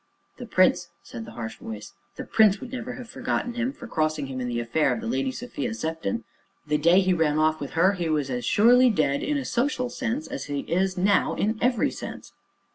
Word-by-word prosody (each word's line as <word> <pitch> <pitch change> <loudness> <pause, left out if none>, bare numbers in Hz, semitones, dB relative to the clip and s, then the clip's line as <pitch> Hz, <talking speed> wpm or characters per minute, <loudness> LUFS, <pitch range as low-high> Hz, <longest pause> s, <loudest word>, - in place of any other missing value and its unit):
"The - - -8
Prince," - - +3
said 115 -1 -8
the 115 - -11
harsh 115 -1 -5
voice, 110 -1 -8 0.2
"the - - -6
Prince 210 -2 +4
would 250 - -9
never 250 0 -4
have 250 -1 -9
forgiven 240 +1 -2
him 240 +2 -1
for 285 -3 -11
crossing 155 -8 -1
him 130 -1 -5
in 125 - -2
the 120 -1 -2
affair 120 +7 +1
of - - -1
the 230 - -7
Lady 260 +3 0
Sophia 245 -1 -4
Sefton; 160 - -3 0.4
the 150 0 0
day 170 +5 +5
he 185 -1 +2
ran 160 -3 +1
off 155 0 +2
with 140 - -5
her 180 +4 +4
he 175 -4 -2
was 150 -4 0
as 125 -1 -2
surely 245 - +5
dead 145 -10 +1
in 295 0 0
a 270 - -3
social 250 -1 0
sense 260 +5 -2
as 135 - -5
he 145 -1 -3
is 185 +2 0
now 195 +2 +2
in 215 +3 0
every 245 -1 +2
sense." - - -8
185 Hz, 220 wpm, -25 LUFS, 150-240 Hz, 0.4 s, day